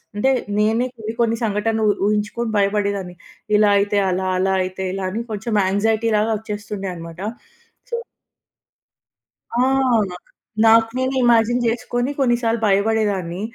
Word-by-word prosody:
అంటే, 260 Hz, +6 st, +2 dB, 0.3 s
నేనే 220 Hz, +3 st, +2 dB
కొన్ని, 220 Hz, 0 st, -4 dB
కొన్ని 230 Hz, -1 st, +2 dB
సంఘటనలు 220 Hz, +1 st, 0 dB
ఉ- -, -, +4 dB
ఊహించుకొని 210 Hz, +2 st, -1 dB
భయపడేదాన్ని. 200 Hz, -2 st, 0 dB, 0.4 s
ఇలా 210 Hz, 0 st, +5 dB
అయితే 205 Hz, +1 st, 0 dB
అలా, 185 Hz, +1 st, -1 dB
అలా 190 Hz, +1 st, +1 dB
అయితే 185 Hz, +1 st, -5 dB
ఇలా 195 Hz, -1 st, -3 dB
అని 215 Hz, +5 st, -3 dB
కొంచెం 215 Hz, +2 st, -3 dB
యాంక్సైటీ 220 Hz, +3 st, +1 dB
లాగా 215 Hz, +2 st, +1 dB
వచ్చేస్తుండే 205 Hz, -2 st, -5 dB
అన్నమాట. 165 Hz, 0 st, -9 dB, 0.7 s
సొ 475 Hz, -, -2 dB, 1.6 s
ఆ! 235 Hz, -, -1 dB, 0.5 s
నాక్ 180 Hz, -, -12 dB, 0.4 s
నాకు 225 Hz, 0 st, +6 dB
నేను 260 Hz, +1 st, 0 dB
ఇమాజిన్ 240 Hz, 0 st, +3 dB
చేసుకొని 245 Hz, +2 st, -1 dB
కొన్నిసార్లు 240 Hz, -3 st, +1 dB
భయపడేదాన్ని. 200 Hz, -3 st, 0 dB
210 Hz, 130 wpm, -20 LUFS, 200-230 Hz, 1.6 s, నాకు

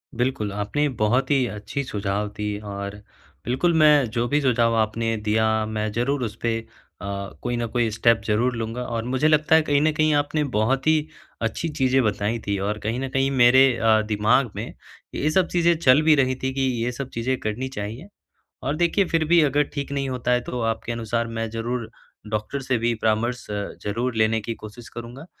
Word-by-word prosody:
बिल्कुल, 120 Hz, -4 st, -1 dB
आपने 105 Hz, +9 st, -1 dB
बहुत 120 Hz, +1 st, +1 dB
ही 135 Hz, -3 st, +3 dB
अच्छी 105 Hz, +6 st, -5 dB
सुझाव 105 Hz, -3 st, -2 dB
दी 105 Hz, -1 st, -2 dB
और 100 Hz, -1 st, -6 dB, 0.5 s
बिल्कुल 130 Hz, +8 st, +1 dB
मैं 150 Hz, -3 st, +6 dB
जो 120 Hz, +2 st, -1 dB
भी 145 Hz, +3 st, +1 dB
सुझाव 115 Hz, -3 st, +2 dB
आपने 115 Hz, +1 st, 0 dB
दिया, 110 Hz, +1 st, +1 dB
मैं 110 Hz, 0 st, -2 dB
ज़रूर 125 Hz, +5 st, -1 dB
उस 110 Hz, -2 st, -4 dB
पे 115 Hz, -1 st, 0 dB, 0.4 s
अ, -, -, -6 dB, 0.4 s
कोई 120 Hz, 0 st, -2 dB
न 120 Hz, -, -1 dB
कोई 120 Hz, 0 st, 0 dB
स्टेप 115 Hz, +1 st, +3 dB
ज़रूर 120 Hz, +4 st, +1 dB
लूँगा 115 Hz, +2 st, -4 dB
और 115 Hz, -2 st, -3 dB
मुझे 130 Hz, +4 st, +1 dB
लगता 155 Hz, 0 st, +4 dB
है 160 Hz, -, +6 dB
कहीं 145 Hz, -2 st, +2 dB
न 155 Hz, +1 st, +3 dB
कहीं 155 Hz, 0 st, +2 dB
आपने 145 Hz, +1 st, +1 dB
बहुत 130 Hz, +5 st, +1 dB
ही 155 Hz, -1 st, +3 dB, 0.3 s
अच्छी 115 Hz, +8 st, -2 dB
चीज़ें 135 Hz, -3 st, +2 dB
बताई 105 Hz, +1 st, 0 dB
थी 100 Hz, 0 st, 0 dB
और 105 Hz, 0 st, -1 dB
कहीं 115 Hz, +3 st, -1 dB
न 135 Hz, 0 st, -3 dB
कहीं 135 Hz, +1 st, +1 dB
मेरे 130 Hz, 0 st, +6 dB
अ, 110 Hz, -1 st, +4 dB
दिमाग 110 Hz, +3 st, +2 dB
में -, -, -5 dB, 0.4 s
ये 150 Hz, -, 0 dB
सब 185 Hz, +1 st, +3 dB
चीज़ें 170 Hz, -1 st, +2 dB
चल 140 Hz, -2 st, +5 dB
भी 155 Hz, 0 st, +5 dB
रही 130 Hz, -2 st, +2 dB
थी 130 Hz, 0 st, -1 dB
कि 135 Hz, -, -2 dB, 0.2 s
ये 120 Hz, -, -1 dB
सब 130 Hz, +2 st, -6 dB
चीज़ें 125 Hz, +3 st, -1 dB
करनी 110 Hz, +5 st, -3 dB
चाहिए। 115 Hz, -, -6 dB, 0.6 s
और 140 Hz, +4 st, -1 dB
देखिए 175 Hz, +4 st, +2 dB
फिर 165 Hz, -1 st, +1 dB
भी 170 Hz, 0 st, +6 dB
अगर 145 Hz, 0 st, +3 dB
ठीक 140 Hz, -1 st, -4 dB
नहीं 140 Hz, -1 st, -1 dB
होता 125 Hz, -1 st, -2 dB
है 125 Hz, -, +3 dB
तो 125 Hz, -, -3 dB
आपके 115 Hz, +1 st, -6 dB
अनुसार 115 Hz, 0 st, -2 dB
मैं 115 Hz, 0 st, -2 dB
ज़रूर 115 Hz, +1 st, -3 dB, 0.4 s
डॉक्टर 110 Hz, +6 st, -3 dB
से 130 Hz, -2 st, 0 dB
भी 115 Hz, +1 st, 0 dB
परामर्श 115 Hz, +3 st, 0 dB
अ, 105 Hz, -1 st, -3 dB
ज़रूर 115 Hz, +4 st, -2 dB
लेने 110 Hz, 0 st, +2 dB
की 115 Hz, +2 st, -4 dB
कोशिश 115 Hz, +2 st, -10 dB
करूँगा। 120 Hz, +6 st, -9 dB
120 Hz, 200 wpm, -23 LUFS, 110-135 Hz, 0.6 s, मैं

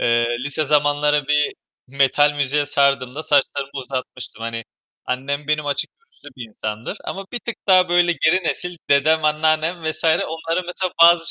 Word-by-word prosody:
Eee, 120 Hz, 0 st, +2 dB, 0.2 s
lise 145 Hz, +2 st, -1 dB
zamanları 145 Hz, 0 st, +2 dB
bir 150 Hz, 0 st, +1 dB, 0.3 s
metal 140 Hz, +2 st, +2 dB
müziğe 145 Hz, 0 st, 0 dB
sardığımda 140 Hz, 0 st, +2 dB
saçlarımı 140 Hz, -2 st, 0 dB
uzatmıştım, 130 Hz, -3 st, -6 dB
hani, 115 Hz, -1 st, -5 dB, 0.4 s
annem 140 Hz, +3 st, -3 dB
benim 150 Hz, -1 st, 0 dB
açık 145 Hz, -1 st, -1 dB
görüşlü 460 Hz, -, -18 dB
bir 120 Hz, -3 st, -8 dB
insandır 110 Hz, +1 st, -6 dB
ama 195 Hz, 0 st, -6 dB
bir 245 Hz, -, -2 dB
tık 235 Hz, -2 st, -6 dB
daha 185 Hz, -2 st, +5 dB
böyle 175 Hz, 0 st, +3 dB
geri 170 Hz, +4 st, +1 dB
nesil 180 Hz, +1 st, +1 dB
dedem, 155 Hz, +3 st, +3 dB
anneannem 155 Hz, +2 st, 0 dB
vs. 155 Hz, 0 st, 0 dB
onlara 165 Hz, +1 st, 0 dB
mesela 180 Hz, +1 st, -3 dB
bazı 170 Hz, 0 st, +6 dB
150 Hz, 155 wpm, -20 LUFS, 140-165 Hz, 0.4 s, bazı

